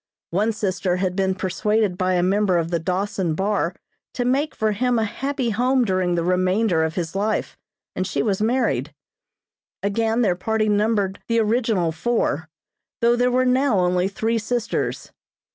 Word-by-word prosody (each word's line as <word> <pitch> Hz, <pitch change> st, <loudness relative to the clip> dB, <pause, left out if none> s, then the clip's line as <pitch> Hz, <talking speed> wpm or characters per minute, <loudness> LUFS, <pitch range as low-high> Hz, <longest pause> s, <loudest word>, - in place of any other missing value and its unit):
One 205 Hz, +6 st, +1 dB
sister 190 Hz, -4 st, -1 dB
had 180 Hz, 0 st, -1 dB
been 190 Hz, -1 st, +1 dB
persuaded 205 Hz, +1 st, 0 dB
by 185 Hz, 0 st, 0 dB
a 175 Hz, -, +2 dB
member 195 Hz, 0 st, +2 dB
of 165 Hz, 0 st, -1 dB
the 170 Hz, -, +1 dB
Dawson 185 Hz, 0 st, -1 dB
Bar 195 Hz, -1 st, 0 dB, 0.4 s
to 245 Hz, -, -1 dB
make 275 Hz, +5 st, 0 dB
for 220 Hz, -1 st, +1 dB
him 245 Hz, +3 st, +1 dB
a 225 Hz, -, +2 dB
happy 260 Hz, +3 st, -2 dB
home 250 Hz, +3 st, +2 dB
during 185 Hz, -3 st, +1 dB
the 170 Hz, -, 0 dB
remainder 185 Hz, 0 st, +2 dB
of 160 Hz, 0 st, -2 dB
his 170 Hz, -1 st, -3 dB
life, 210 Hz, +2 st, -1 dB, 0.4 s
and 185 Hz, -, -1 dB
she -, -, -1 dB
was 205 Hz, -3 st, 0 dB
married. 215 Hz, -, 0 dB, 0.9 s
Again 225 Hz, +3 st, +1 dB
their 185 Hz, -5 st, +2 dB
party 215 Hz, +4 st, 0 dB
numbered 205 Hz, -2 st, +1 dB
the 230 Hz, -, +1 dB
original 220 Hz, -6 st, +1 dB
four, 160 Hz, -4 st, -1 dB, 0.5 s
though 235 Hz, +1 st, +4 dB
there 245 Hz, +1 st, +2 dB
were 255 Hz, +1 st, +2 dB
now 255 Hz, -2 st, +2 dB
only 180 Hz, +1 st, +2 dB
three 225 Hz, +3 st, -1 dB
sisters. 230 Hz, +1 st, -2 dB
205 Hz, 165 wpm, -22 LUFS, 180-230 Hz, 0.9 s, though